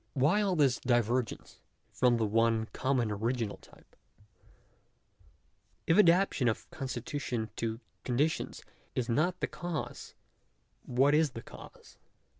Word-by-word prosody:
Why 150 +10 +3
all 195 -3 +1
this 140 -6 +3
divergence 120 -1 0 0.3
from 125 -2 +3
the 115 - +1
one 115 +1 +2
common 130 -4 0
original 115 +1 -2
type? - - -21 1.9
If 165 - +3
adaptation 175 -8 +4
of 110 - -1
constitution 125 -4 -4
to 115 0 -2 0.2
conditions 140 +6 -1 0.3
is 125 -1 -1
not 155 +9 +1
the - - +1
cause, 170 -3 -5 0.7
what 135 +4 +3
is 150 -3 +3
the 115 - -7
cause? - - -14
125 Hz, 115 wpm, -31 LUFS, 115-150 Hz, 1.9 s, adaptation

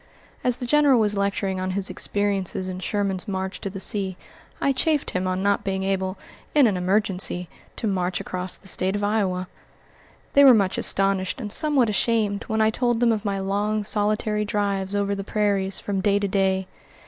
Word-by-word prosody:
As 250 -1 +2
the 250 - -5
General 285 -1 +4
was 210 -1 +1
lecturing 200 -1 -1
on 185 +1 -2
his 200 -1 0
experiences 200 -2 -1
in 185 0 -5
Sherman's 195 0 -2
march 190 -1 -4
to 195 - -3
the 195 0 -7
sea, 190 -2 -1 0.4
I 275 - +2
chaffed 300 +2 0
him 185 0 -1
on 185 +1 -1
not 200 0 +1
being 190 -1 -2
able, 190 0 -1 0.4
in 290 -3 +6
an 210 -4 +2
emergency, 180 -2 +1 0.3
to - - -4
march 185 -3 -1
across 185 0 -4
the 195 - -10
State 190 +1 +1
of 205 - -2
Iowa. 195 -3 0 0.9
They 280 - +7
were 260 -3 +9
much 195 -3 +1
astonished 195 +1 +1
and 210 -4 -4
somewhat 295 -6 +2
ashamed, 215 -1 0
when 220 0 -1
I 220 0 +4
told 240 0 0
them 240 -1 +3
of 220 -1 -2
my 200 -1 -1
long, 205 +2 -1
solitary 210 0 0
drives 200 -2 -1
over 200 0 0
the 195 0 -4
prairies 200 -2 0
from 195 -2 -2
day 200 0 +2
to 205 0 0
day. 190 -1 +1
200 Hz, 190 wpm, -24 LUFS, 190-215 Hz, 0.9 s, were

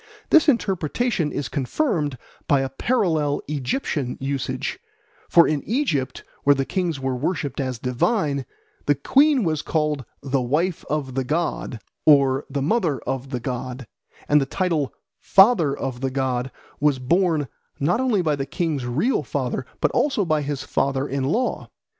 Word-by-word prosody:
This 315 -1 +6
interpretation 195 - 0
is 140 - -3
confirmed 150 - -1 0.3
by 140 -1 +4
a 135 - -2
parallel 155 - +1
Egyptian 145 - -2
usage; 135 -1 -3 0.5
for 170 - +6
in 150 -2 0
Egypt, 165 - -1 0.2
where 145 0 +5
the 135 0 -1
kings 175 -5 -1
were 130 -1 -1
worshipped 145 0 -2
as 130 -3 -2
divine, 140 - 0 0.4
the 145 - +4
queen 275 - +4
was 155 -4 0
called 150 -3 -1 0.2
"the 135 -1 0
wife 155 +8 0
of 145 -4 -2
the 135 +1 0
god" 150 -4 -2 0.2
or 140 -2 +4
"the 140 0 -2
mother 170 - +1
of 135 +1 -4
the 125 -2 -3
god," 125 +1 -5 0.4
and 150 0 +5
the 135 - -1
title 165 -5 0 0.3
"father 190 - +5
of 130 -2 -4
the 135 - 0
god" 130 -1 -1 0.3
was 145 -2 +3
borne 160 +2 +1 0.3
not 175 +10 +2
only 230 -8 +2
by 155 -3 +1
the 135 -1 -4
king's 150 -4 -2
real 160 - +1
father - - -3
but - - +3
also 265 -9 +1
by 155 -2 +1
his 145 -1 -3
father 140 -1 0
in 135 -1 -2
law. 230 - -1
145 Hz, 155 wpm, -23 LUFS, 135-175 Hz, 0.5 s, This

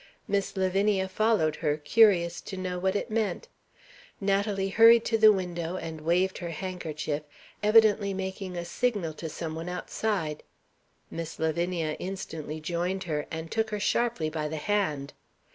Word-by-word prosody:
Miss 200 0 -1
Lavinia 190 +1 +2
followed 195 -6 +1
her, 150 0 0
curious 175 +1 +4
to 190 - -7
know 180 -1 -3
what 190 +2 0
it 215 - -2
meant. 225 - -1 0.7
Natalie 195 0 0
hurried 230 +3 +7
to 225 - +2
the 215 0 +9
window, 180 -3 -2
and 160 -3 -6
waved 180 +4 +1
her 175 - -4
handkerchief 155 -4 -4 0.4
evidently 210 -1 +5
making 190 -1 -4
a 170 - -3
signal 200 -4 -1
to 160 +1 -6
some 160 +1 -5
one 165 +2 -5
outside. 180 -3 -2 0.7
Miss 165 -1 -5
Lavinia 165 0 -1
instantly 160 -5 -5
joined 175 +4 -2
her, 150 -4 -3
and 160 0 -6
took 220 -1 0
her 210 -1 -3
sharply 230 -5 +1
by 155 -1 -2
the 155 +1 -4
hand. 155 -6 -1
185 Hz, 150 wpm, -28 LUFS, 160-205 Hz, 0.7 s, the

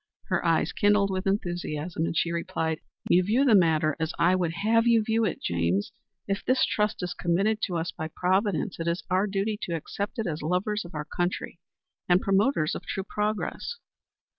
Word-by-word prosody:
Her - - +1
eyes - - +2
kindled 205 -1 +3
with 190 +1 -2
enthusiasm, 175 -4 -2
and 165 - -2
she 170 - +1
replied: 165 -2 -2 0.3
"You 180 - +5
view 225 +9 +2
the 250 - +5
matter 160 -5 +4
as 160 +1 -1
I 175 +2 +4
would 175 -3 0
have 225 +6 +2
you 230 -2 +5
view 225 +1 +1
it, 180 - -2
James. 85 +3 0 0.4
If 200 0 -2
this 255 +1 +3
trust 210 -2 -1
is 175 0 -2
committed 200 +6 +1
to 180 -4 -3
us 165 +2 -2
by 160 - -5
Providence, 185 +1 0
it 165 - -3
is 170 +1 -1
our 190 +3 +3
duty 205 +2 -1
to 170 - -2
accept 200 - -4
it 225 - -1
as 160 -4 -3
lovers 185 +6 -1
of 170 - -11
our 150 0 -3
country 175 +4 -3 0.5
and 180 0 +6
promoters 195 - +2
of - - -5
true 195 - -3
progress." 210 - -2
185 Hz, 190 wpm, -27 LUFS, 165-210 Hz, 0.5 s, and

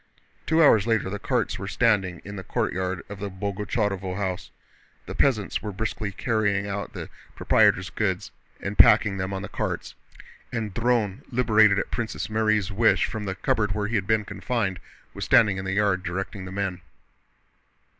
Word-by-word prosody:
Two 165 0 +4
hours 110 -7 +5
later 110 -4 +1
the 105 - -4
carts - - -1
were - - -5
standing 95 -7 +1
in 100 +1 -7
the 95 - -6
courtyard 95 0 -2
of 100 -1 -8
the 100 0 -4
Boguchárovo 100 -1 -2
house. 95 -3 -3 0.6
The - - -6
peasants 110 -8 +1
were 105 - -4
briskly 105 +1 -3
carrying 100 -2 0
out 100 -1 -4
the - - -6 0.3
proprietor's - - +3
goods - - -2 0.3
and 100 +1 -5
packing 105 -4 +6
them 95 +1 -3
on 95 0 -4
the - - -5
carts, - - -4 0.6
and 110 -5 -3
Dron, 115 -3 0
liberated 110 -5 +4
at - - -2
Princess 110 -2 -3
Mary's 110 -3 +1
wish 110 +3 +3
from 110 -2 -5
the 95 -1 -3
cupboard 105 +1 0
where 105 0 -1
he 110 - -4
had 95 -3 0
been 110 -1 +2
confined, 95 -1 -2 0.3
was - - -5
standing 105 -4 +4
in 95 - -5
the 95 - -2
yard 100 -2 +2
directing 95 +2 -4
the 90 - -8
men. 95 -2 -3
100 Hz, 175 wpm, -25 LUFS, 95-110 Hz, 0.6 s, packing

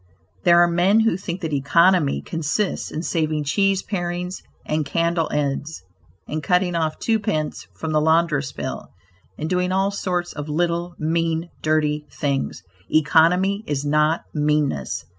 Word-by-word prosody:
There 170 -1 +7
are 175 - +6
men 180 +6 +3
who 225 -6 +2
think 185 -1 -5
that 160 -3 -3
economy 165 +2 +3
consists 165 +5 -2
in 155 - -4
saving 155 -3 0
cheese 195 +6 +1
parings 180 -1 -3 0.2
and 155 0 0
candle 165 +2 0
ends, 145 - -2 0.4
in 155 +1 -4
cutting 180 +4 +1
off 160 -2 -1
two 225 -1 +1
pence 155 -7 -2
from 160 - -4
the 155 0 +2
laundress' 160 -3 +2
bill - - -5 0.5
and 155 - -3
doing 180 +1 0
all 195 +1 +1
sorts 180 -3 -2
of 150 0 -6
little, 170 +2 -1
mean, 165 +1 -1
dirty 150 -1 0
things. 140 -8 -2 0.3
Economy 180 +6 +3
is 145 -1 -2
not 150 +2 +2
meanness. 150 - 0
165 Hz, 145 wpm, -22 LUFS, 150-180 Hz, 0.5 s, There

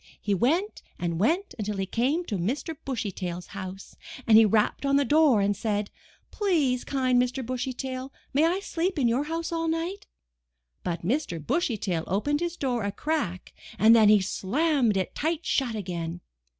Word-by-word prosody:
He 205 - -1
went 325 - +1 0.2
and 170 -2 -2
went 340 - +1
until 210 -1 -2
he 195 - -1
came 270 - 0
to 205 - -3
Mr. 270 - -2
Bushy 235 -6 -2
Tail's 175 -1 -5
house, 195 0 -8 0.3
and 225 - +5
he 220 0 +8
rapped 210 +4 +1
on 275 0 +2
the 280 0 +3
door 295 -6 +4
and 200 +1 +1
said: 205 -1 -2 0.4
'Tlease, 310 - +1
kind 255 -3 +2
Mr. 250 +1 -2
Bushy 255 +1 -2
Tail, 260 +1 -5 0.2
may 285 +3 +3
I 365 +4 0
sleep 360 -1 -2
in 260 -4 +3
your 250 +5 +1
house 330 +2 -3
all 330 -1 -1
night?" 335 +5 -3 0.8
But 170 -1 -3
Mr. 245 - -1
Bushy 255 - 0
Tail 175 -5 -2
opened 290 +11 0
his 345 0 -3
door 250 -4 -1
a 200 - -1
crack 205 - -3 0.2
and 225 +2 +7
then 220 -2 +6
he 210 -1 +6
slammed 240 - +1
it 185 - -2
tight 320 +2 -2
shut 250 -5 0
again. 175 -4 -4
245 Hz, 180 wpm, -27 LUFS, 200-310 Hz, 0.8 s, he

